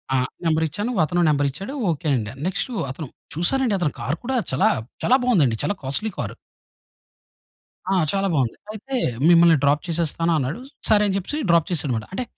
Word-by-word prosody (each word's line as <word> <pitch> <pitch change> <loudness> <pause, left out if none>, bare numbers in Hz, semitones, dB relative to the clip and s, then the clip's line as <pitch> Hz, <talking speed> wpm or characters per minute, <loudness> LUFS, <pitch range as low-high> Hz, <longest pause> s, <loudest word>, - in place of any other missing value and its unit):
ఆ! - - +4 0.3
నంబర్ 160 0 +2
ఇచ్చాను. 205 - -3
అతను 175 +3 0
నంబర్ 145 -1 +2
ఇచ్చాడు. 195 - -7 0.2
ఓకే 160 +1 -4
అండి. 110 -3 -3 0.2
నెక్స్ట్ 190 +6 -2 0.2
అతను 145 +2 -7 0.3
చూసారండి 230 +6 +1
అతను 160 -5 0
కార్ 140 +6 -1
కూడా 260 +2 -2 0.2
చాలా 130 - +3 0.3
చాలా 250 - +5
బావుందండి. 160 - +3
చాలా 205 - 0
కాస్ట్‌లీ 140 +12 -2
కారు. 110 - -4 1.6
ఆ! - - +3 0.2
చాలా 195 0 0
బావుంది. 130 -6 0 0.2
అయితే 265 +5 -6 0.3
మిమ్మల్ని 170 -1 +6
డ్రాప్ 145 +1 +3
చేసేస్తాను 165 0 0
అన్నాడు. 145 - -2 0.3
సరే 210 -1 +5
అని 195 - 0
చెప్పేసి 195 +10 -3
డ్రాప్ 170 -2 +4
చేసాడు 145 -6 0
మాట. 110 - -5
అంటే 255 - -2
170 Hz, 170 wpm, -22 LUFS, 145-200 Hz, 1.6 s, మిమ్మల్ని